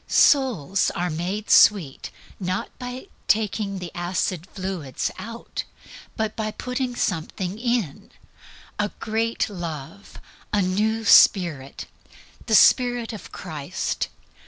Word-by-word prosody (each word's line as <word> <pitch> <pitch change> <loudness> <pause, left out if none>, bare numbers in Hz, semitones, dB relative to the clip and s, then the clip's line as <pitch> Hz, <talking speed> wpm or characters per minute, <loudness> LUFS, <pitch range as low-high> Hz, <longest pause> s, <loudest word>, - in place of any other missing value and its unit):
Souls 205 - +3
are 175 0 -1
made 185 +7 -3
sweet 175 -11 +5 0.3
not 190 +5 -2
by 250 +1 -6 0.2
taking 210 -2 +1
the 180 -2 -6
acid 175 0 -2
fluids 185 -8 -4
out, 230 +1 -6 0.5
but 220 -1 -1
by 215 -1 -2
putting 250 +2 -3
something 185 +1 -2
in 235 - -1 0.7
a 210 0 +1
great 225 +1 0
Love, 175 0 -7 0.3
a 210 - +2
new 215 +4 0
Spirit, 165 -10 +4 0.6
the 220 - +4
Spirit 245 0 +4
of 215 - -9
Christ. 160 0 -3
200 Hz, 110 wpm, -24 LUFS, 175-225 Hz, 0.7 s, sweet